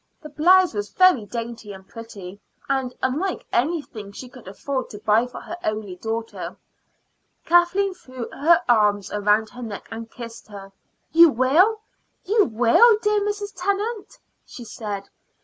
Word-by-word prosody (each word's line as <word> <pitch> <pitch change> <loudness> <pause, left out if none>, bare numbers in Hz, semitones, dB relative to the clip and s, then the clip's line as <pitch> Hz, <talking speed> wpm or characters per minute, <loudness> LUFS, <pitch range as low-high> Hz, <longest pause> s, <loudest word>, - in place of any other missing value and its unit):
The 305 - -8
blouse 355 +4 +4
was 205 -1 -4
very 365 - +4
dainty 230 -2 -6
and 190 0 -13
pretty, 205 -5 -10 0.3
and 265 -2 -1
unlike 315 +9 -1
anything 245 -7 -2
she 250 +5 -10
could 250 -4 -15
afford 260 +7 -4
to 210 - -9
buy 215 +3 +2
for 250 - -9
her 345 - -8
only 215 -3 -3
daughter. 225 +3 -5 0.9
Kathleen 350 +3 +3
threw 255 -9 -9
her 335 +4 +3
arms 210 -4 +2
round 210 +1 +2
her 245 - -10
neck 220 -4 -7
and 225 0 -7
kissed 230 -1 -10
her. 200 -2 -11 0.4
"You 335 +1 +8
will 315 - +3 0.4
you 420 +2 +3
will, 245 - +5
dear 420 -1 +1
Mrs. 410 0 -3
Tennant," 400 +4 -3 0.3
she 245 - -11
said. 205 -3 -6
245 Hz, 150 wpm, -23 LUFS, 215-350 Hz, 0.9 s, You